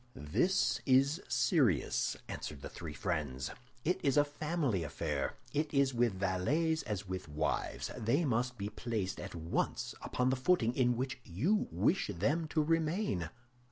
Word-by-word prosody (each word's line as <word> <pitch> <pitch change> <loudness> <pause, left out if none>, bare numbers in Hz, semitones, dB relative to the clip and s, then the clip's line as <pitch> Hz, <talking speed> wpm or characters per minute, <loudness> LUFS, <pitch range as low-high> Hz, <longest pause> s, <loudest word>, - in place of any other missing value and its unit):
"This 85 - +1
is 135 +5 +4
serious," 120 - +2
answered 75 -2 -6
the - - -5
three 80 -4 -7
friends; 75 -7 -2 0.3
"it 180 +4 +2
is 140 0 +3
a 145 - +6
family 145 - -1
affair. 75 -1 -2 0.2
It 150 0 0
is 140 -1 +4
with 120 -3 +2
valets 115 - +1
as 105 -2 -3
with 95 -1 -4
wives, 75 +1 -1
they 125 +7 +1
must 125 -1 0
be 100 0 -3
placed 105 -3 -3
at - - -6
once 80 0 -1
upon 125 +1 0
the - - +2
footing 130 -4 +2
in 125 -2 +3
which 130 +1 -2
you 155 - +1
wish 85 +2 +2
them 150 - 0
to 155 0 +1
remain. 160 - 0
120 Hz, 155 wpm, -34 LUFS, 90-150 Hz, 0.3 s, a